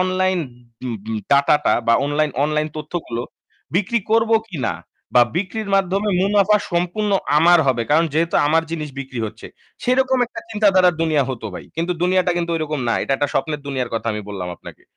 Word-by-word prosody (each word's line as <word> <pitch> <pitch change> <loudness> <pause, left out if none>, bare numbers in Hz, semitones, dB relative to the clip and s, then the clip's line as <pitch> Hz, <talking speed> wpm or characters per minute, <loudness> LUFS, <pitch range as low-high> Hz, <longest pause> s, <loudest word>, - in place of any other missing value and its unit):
Online 185 0 +1 0.5
উম 120 -2 -3
উম 110 - -2
data 140 +1 +5
টা - - +4
বা 115 - +5
online 145 +1 0
online 150 0 0
তথ্যগুলো 150 -6 -4 0.5
বিক্রি 210 +5 +1
করব 225 0 +3 0.2
কিনা 155 - -2 0.4
বা 120 - +8
বিক্রির 200 +4 -3
মাধ্যমে 195 +2 +1
মুনাফা 205 +1 +4 0.2
সম্পূর্ণ 180 +5 0 0.3
আমার 175 +2 +6
হবে। 125 -3 +2
কারণ 165 +3 +4
যেহেতু 165 +1 +1
আমার 160 +2 +3
জিনিস 155 -2 -4
বিক্রি 130 -2 -7
হচ্ছে 110 +1 -10 0.4
সেরকম 260 +1 +2
একটা - - -8
চিন্তা 210 -1 +3
ধারার 180 -2 +5
দুনিয়া 155 -3 +2
হতো 115 -4 -5
ভাই। - - -8
কিন্তু 170 +2 0
দুনিয়াটা 180 0 +2
কিন্তু 170 -1 -1
ঐরকম 155 -2 -2
না। 115 - +2
এটা - - -1
একটা 145 +1 0
স্বপ্নের 150 +2 -1
দুনিয়ার 130 -3 -2
কথা 115 - -3
আমি 105 0 -4
বললাম 95 -3 -5
আপনাকে। - - -13
165 Hz, 180 wpm, -20 LUFS, 140-185 Hz, 0.5 s, বা